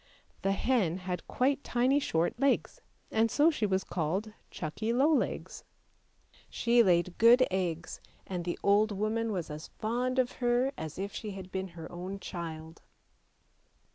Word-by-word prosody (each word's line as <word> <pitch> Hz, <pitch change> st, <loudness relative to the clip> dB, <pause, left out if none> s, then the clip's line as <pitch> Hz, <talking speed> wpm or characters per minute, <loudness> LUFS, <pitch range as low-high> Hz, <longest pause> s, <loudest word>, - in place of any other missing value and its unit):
The 195 Hz, -, +1 dB
hen 195 Hz, -6 st, +1 dB
had 180 Hz, -2 st, -5 dB
quite 275 Hz, +2 st, +1 dB
tiny 255 Hz, +4 st, +2 dB
short 170 Hz, -, 0 dB
legs, 275 Hz, 0 st, +1 dB, 0.3 s
and 225 Hz, +1 st, +3 dB
so 300 Hz, +7 st, +4 dB
she 220 Hz, -9 st, 0 dB
was 190 Hz, -1 st, 0 dB
called 190 Hz, +6 st, -2 dB
" -, -, -37 dB
Chuckie 195 Hz, +8 st, -3 dB
low 275 Hz, +7 st, +4 dB
legs." -, -, -2 dB, 0.9 s
She 235 Hz, 0 st, +3 dB
laid 175 Hz, -3 st, +2 dB
good 240 Hz, +3 st, +7 dB
eggs, 170 Hz, -3 st, -2 dB, 0.2 s
and 180 Hz, -2 st, -4 dB
the 175 Hz, 0 st, -3 dB
old 210 Hz, +2 st, +4 dB
woman 215 Hz, +3 st, -1 dB
was 175 Hz, -6 st, -3 dB
as 150 Hz, +1 st, -7 dB
fond 245 Hz, +4 st, -1 dB
of 255 Hz, -1 st, +2 dB
her 245 Hz, +2 st, +2 dB
as 155 Hz, -1 st, -6 dB
if 195 Hz, +2 st, -4 dB
she 215 Hz, -, -5 dB
had 190 Hz, -1 st, -9 dB
been 190 Hz, 0 st, -3 dB
her 165 Hz, -, -7 dB
own 185 Hz, +3 st, -6 dB
child. 165 Hz, -3 st, -7 dB
200 Hz, 160 wpm, -30 LUFS, 175-240 Hz, 0.9 s, good